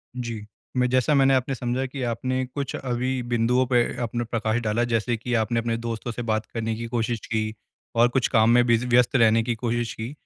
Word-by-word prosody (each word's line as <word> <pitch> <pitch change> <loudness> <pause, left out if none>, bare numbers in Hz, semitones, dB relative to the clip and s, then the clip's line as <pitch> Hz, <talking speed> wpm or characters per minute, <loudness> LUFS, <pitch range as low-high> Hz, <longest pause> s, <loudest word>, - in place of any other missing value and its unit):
जी, 115 -4 -5 0.3
मैं 125 0 +3
जैसा 130 +4 +2
मैंने 135 -1 +5
आपने 130 +1 +1
समझा 125 +2 -2
कि 135 +1 -6
आपने 130 +2 -1
कुछ 135 +2 -5
अभी 125 0 -2
बिंदुओं 120 +2 +2
पे 125 -1 +3 0.2
अपना 120 +1 -2
प्रकाश 115 0 -1
डाला 115 +1 0
जैसे 115 +1 0
कि 120 +2 -4
आपने 115 0 +1
अपने 115 0 -1
दोस्तों 115 0 -4
से 120 - -5
बात 110 -1 -1
करने 115 -1 -2
की 115 +1 -5
कोशिश 115 -1 -1
की, 110 -1 -2 0.4
और 120 +1 +5
कुछ 125 0 +1
काम 110 -2 +3
में 120 +1 +5
बिज़ी 120 +1 +2
व्यस्त 125 +1 +3
रहने 115 -2 +4
की 120 0 -1
कोशिश 120 0 -2
की। 110 +3 -6
120 Hz, 210 wpm, -24 LUFS, 115-125 Hz, 0.4 s, मैंने